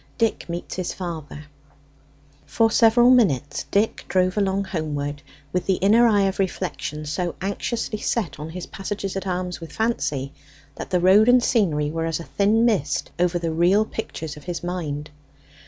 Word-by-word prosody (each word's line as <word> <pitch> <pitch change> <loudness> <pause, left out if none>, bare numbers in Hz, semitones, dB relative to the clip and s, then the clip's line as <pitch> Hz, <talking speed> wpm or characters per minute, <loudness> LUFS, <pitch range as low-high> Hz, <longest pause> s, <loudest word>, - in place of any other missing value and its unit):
DICK 225 -5 0
MEETS 170 +1 -5
HIS 185 -1 -2
FATHER 160 -5 -6 1.0
For 225 -1 +2
several 240 +2 +5
minutes 145 - +2
Dick 210 +3 +1
drove 185 -1 +1
along 200 -1 +1
homeward, 150 -5 -3 0.3
with 180 - -1
the 190 - +3
inner 220 +6 +4
eye 205 -3 +3
of 195 0 -1
reflection 155 -5 -3
so 170 +3 -2
anxiously 210 +3 -3
set 210 -10 -2
on 150 +2 -6
his 180 +2 -6
passages 195 0 -5
at 195 0 -4
arms 180 -1 -3
with 165 - -8
Fancy, 145 - -1 0.4
that - - -7
the 180 - +2
road 195 +6 +6
and 245 0 +6
scenery 150 -12 +1
were 165 0 -2
as 165 - -2
a - - -6
thin 210 +6 +2
mist 155 -12 0
over 175 0 +2
the 170 -1 -2
real 180 +6 +3
pictures 160 -9 -6
of 150 - -13
his 175 -1 -4
mind. 155 -4 -4
180 Hz, 170 wpm, -23 LUFS, 160-205 Hz, 1.0 s, road